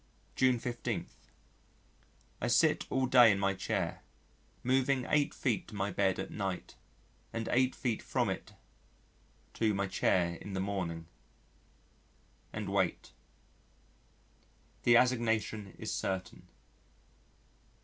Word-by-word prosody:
June 130 -1 +4
15. 120 0 -3 1.4
I - - 0
sit - - +3
all 130 0 +1
day 125 -3 +7
in 100 - +1
my 100 0 +1
chair, 95 -1 -2 0.6
moving 130 0 +2
8 145 -1 +2
feet 115 -8 -1
to - - -10
my 100 0 -1
bed 95 0 +1
at - - -5
night, 95 -3 -4 0.6
and 115 0 -3
8 130 +1 +3
feet 120 -5 -1
from - - 0
it - - -4 1.0
to 110 -2 +1
my 100 0 0
chair 85 -2 +1
in 100 - -8
the 95 - -2
morning 90 -4 -3 1.5
and 105 -2 -4
wait. 95 -3 0 1.7
The 120 - +7
assignation 115 -5 +1
is - - -4
certain. 95 -1 -4
105 Hz, 115 wpm, -32 LUFS, 95-125 Hz, 1.7 s, day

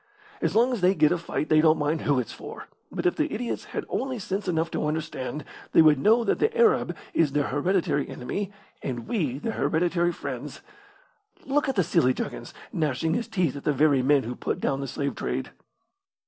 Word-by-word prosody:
As - - 0
long 245 +3 +4
as 230 - -2
they 185 +2 +4
get 150 -2 +4
a 175 - +2
fight 155 -2 -3
they 155 0 +5
don't 155 0 +5
mind 150 +2 0
who 145 -2 +2
it's 125 - -2
for; - - -9 0.2
but - - -4
if 360 - +2
the 310 -1 0
idiots 235 +2 -3
had - - -5
only 260 -1 -2
sense 195 -1 -3
enough 165 -1 0
to 150 - -1
understand, 150 -2 -3 0.3
they 165 - +8
would 150 -3 +5
know 225 - +4
that - - +1
the 445 +2 +1
Arab 460 -2 +3 0.2
is 155 -4 +2
their 145 -1 +1
hereditary 150 -1 0
enemy, 195 +10 -4 0.3
and 120 -3 -4
we 150 - -1
their 225 +10 -3
hereditary 175 0 +1
friends. - - -6 0.8
Look 285 +1 +1
at 270 - -1
the 190 - +3
silly 130 -4 +2
juggins, - - -5 0.2
gnashing 160 +1 0
his 235 - -1
teeth 175 -9 0
at 140 - -7
the 150 - +2
very 140 -1 +4
men 140 +1 +3
who 120 +2 -4
put - - -3
down 135 0 -1
the 135 - -3
slave 140 +2 -2
trade!" - - -3
160 Hz, 205 wpm, -26 LUFS, 145-205 Hz, 0.8 s, they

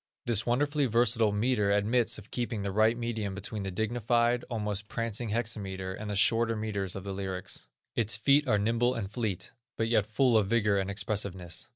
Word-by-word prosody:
This 115 -1 +2
wonderfully 145 +3 +1
versatile 115 -1 +3
metre 105 0 +1
admits 110 +4 +2
of 105 0 -13
keeping 115 -4 -2
the 100 - -2
right 110 +3 +3
medium 110 -5 -3
between 100 +1 -4
the 95 - -3
dignified, 120 +4 +1
almost 105 -3 -2
prancing 115 0 -3
hexameter, 100 -4 -2
and 105 +2 -6
the 105 - -2
shorter 115 +3 +3
metres 100 -4 -2
of 95 - -6
the 100 -1 -5
lyrics. 95 -7 -5 0.3
Its 110 -2 +2
feet 140 +6 +3
are 105 -4 +3
nimble 115 +4 +1
and 100 -4 -4
fleet, 105 -5 -3 0.3
but 115 0 0
yet 110 -3 +2
full 120 +1 +3
of 105 -3 +2
vigor 105 -2 +2
and 95 0 -2
expressiveness. 100 -1 -2
110 Hz, 185 wpm, -29 LUFS, 100-115 Hz, 0.3 s, versatile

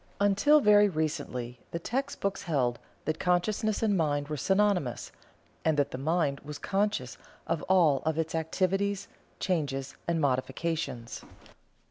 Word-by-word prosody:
Until 205 +10 +5
very 210 -2 +6
recently 145 -7 -3
the - - -3
text 270 +11 -3
books 200 0 -1
held 130 -8 0 0.3
that 155 +1 -1
Consciousness 200 +5 +1
and 210 -2 +3
Mind 145 -4 0
were 155 - -2
synonymous, 190 - +1 0.5
and 160 -2 +2
that 145 - +1
the 130 - -5
Mind 150 -1 +1
was 150 0 -8
conscious 200 -10 -1 0.3
of 160 - -1
all 165 -7 +5
of 160 0 0
its 160 -1 -1
activities, 190 +5 0 0.3
changes 140 -7 -2
and 170 -1 +1
modifications. 135 -2 -2
165 Hz, 135 wpm, -29 LUFS, 145-200 Hz, 0.5 s, very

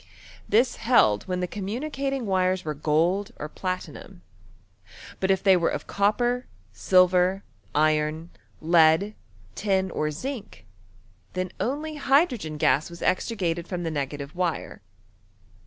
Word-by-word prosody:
This 235 +5 +3
held 110 - +3
when 180 -1 -2
the 180 - -1
communi 215 - -4
cating 275 -1 -2
wires 185 -1 +1
were 155 - -2
gold 170 +9 0
or 150 - -5
platinum; 175 - -6 1.0
but 190 - 0
if 190 -1 +2
they 195 -1 +6
vere 175 -2 +2
of - - -4
copper, 240 +5 0 0.3
silver, 185 +1 +3 0.3
iron, 155 +2 +1 0.3
lead, 165 +4 +4 0.4
tin, 190 -2 0
or 155 -1 -1
zinc, 240 - -7 0.7
then 185 0 -3
only 300 +5 -3
hydrogen 265 - +1
gas 145 +2 +2
was 170 0 -9
extricated 180 -3 -1
from 180 -2 -4
the 165 - -2
negative 145 +1 -4
wire. 175 -2 -3
185 Hz, 125 wpm, -25 LUFS, 160-210 Hz, 1.0 s, they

